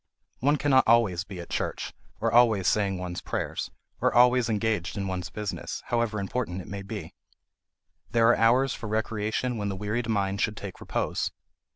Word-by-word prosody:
One 145 +4 +3
cannot 135 -4 +4
be - - 0
always 100 -7 +2
at 90 -3 -8
church, - - -2 0.3
or - - +1
always 115 -5 +5
saying 100 -3 +2
one's 90 -1 -5
prayers, - - -3 0.3
or - - +2
always 125 0 +5
engaged 105 -5 0
in 100 -1 -2
one's 90 -1 -3
business, 105 +2 -5
however 115 -3 0
important 100 -2 -2
it 95 - -8
may 100 0 -5
be; 95 - -7 1.0
there 115 0 +4
are 120 - +6
hours 125 +4 +4
for 115 - -6
recreation 110 +2 -1
when 100 -1 -2
the 100 - -3
wearied 110 +4 -2
mind 100 -2 0
should 105 -1 0
take 100 -3 -7
repose. - - -1
105 Hz, 175 wpm, -27 LUFS, 95-120 Hz, 1.0 s, are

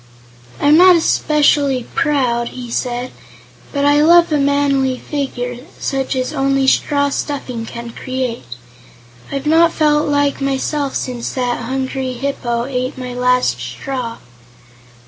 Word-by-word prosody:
"I'm 295 +2 +5
not 360 -1 +7
specially 285 -6 +2
proud," 255 -7 +1
he 245 -2 -8
said, 245 +1 -2 0.6
"but 280 0 0
I 290 +1 +4
love 340 +2 +5
a 300 - +2
manly 275 -2 +1
figure, 245 -4 -4 0.2
such 270 0 -2
as 255 +3 -2
only 275 -1 +1
straw 285 +1 +2
stuffing 255 -5 -4
can 235 0 -7
create. 245 - -4 0.8
I've 275 0 -4
not 325 +2 +4
felt 300 -2 +2
like 285 -1 +1
myself 275 +1 -1
since 245 -2 -3
that 245 -2 -1
hungry 260 +1 -3
Hip 275 +3 -3
po 235 -1 -1
ate 255 -1 -3
my 250 -1 -6
last 250 - +1
straw." 230 - -5
265 Hz, 130 wpm, -17 LUFS, 245-285 Hz, 0.8 s, not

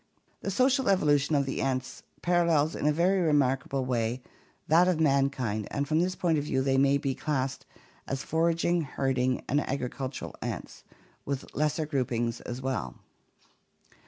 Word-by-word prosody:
The - - -4
social 260 +4 +2
evolution 150 -5 +3
of 140 -1 +2
the 135 - -3
ants 130 -1 -2 0.2
parallels 170 -3 +2
in - - -1
a - - +5
very 180 +5 +2
remarkable 135 -4 +1
way 120 0 -1 0.4
that 170 +3 +5
of 180 -3 +1
mankind 135 -8 +1
and 140 0 -2
from 155 +2 +2
this 180 +2 0
point 165 -4 +1
of - - -3
view 130 -3 0
they 135 0 +2
may 140 +1 +4
be 140 -2 -1
classed 135 -2 -2 0.4
as 135 0 -3
foraging, 165 +1 +1
herding, 130 -3 -1
and 145 +3 +2
agricultural 130 0 -4
ants, - - -6 0.4
with 140 -1 -5
lesser 155 +1 0
groupings 120 -5 -1
as 125 +2 -6
well. 130 - -2
140 Hz, 155 wpm, -28 LUFS, 130-160 Hz, 0.4 s, a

